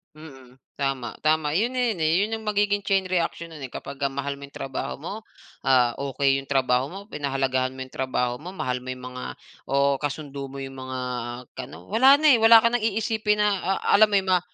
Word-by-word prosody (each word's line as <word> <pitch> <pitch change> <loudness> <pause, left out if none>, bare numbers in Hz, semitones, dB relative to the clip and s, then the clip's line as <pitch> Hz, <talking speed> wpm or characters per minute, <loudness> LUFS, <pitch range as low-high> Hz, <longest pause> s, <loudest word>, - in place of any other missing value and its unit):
Mm, 135 -4 -14 0.2
tama, 135 -3 -2
tama 155 0 +2
'yon 235 +5 0
na 250 -2 +1
'yon, 215 - -2
eh, 160 0 +2
'yon 225 +2 -1
'yong 220 - -11
magiging 205 -1 +1
chain 195 -1 +3
reaction 170 -1 -1
nun, 150 -4 -8
eh, 130 - -12
kapagka 140 0 -4
mahal 140 0 -3
mo 140 - -9
'yong 140 - -20
trabaho 135 -1 -4
mo, 175 - -5 0.5
ah, 125 -3 +3
okey 135 0 +1
'yong 135 - -6
trabaho 130 -2 +2
mo, 190 +7 -8
pinahalagahan 135 -2 -1
mo 130 - -8
'yong 130 - -7
trabaho 125 -2 -1
mo, 180 +5 -9
mahal 125 -9 -2
mo 130 +1 -5
'yong 125 - -12
mga 125 0 -7 0.4
o 140 0 +2
kasundo 140 -1 -5
mo 135 0 -8
'yong 135 0 -7
mga 130 0 -5 0.6
kaano. - - -9
Wala 265 +7 +6
na, 305 - +6
eh, 250 - +7
wala 225 0 +8
ka 235 - +3
ng 235 -2 0
iisipin 215 -1 0
na, 205 -2 +2 0.2
ah, - - -3 0.2
alam 215 - +8
mo 210 - -7
'yon, 190 - -5
ma - - -1
140 Hz, 220 wpm, -25 LUFS, 135-205 Hz, 0.6 s, wala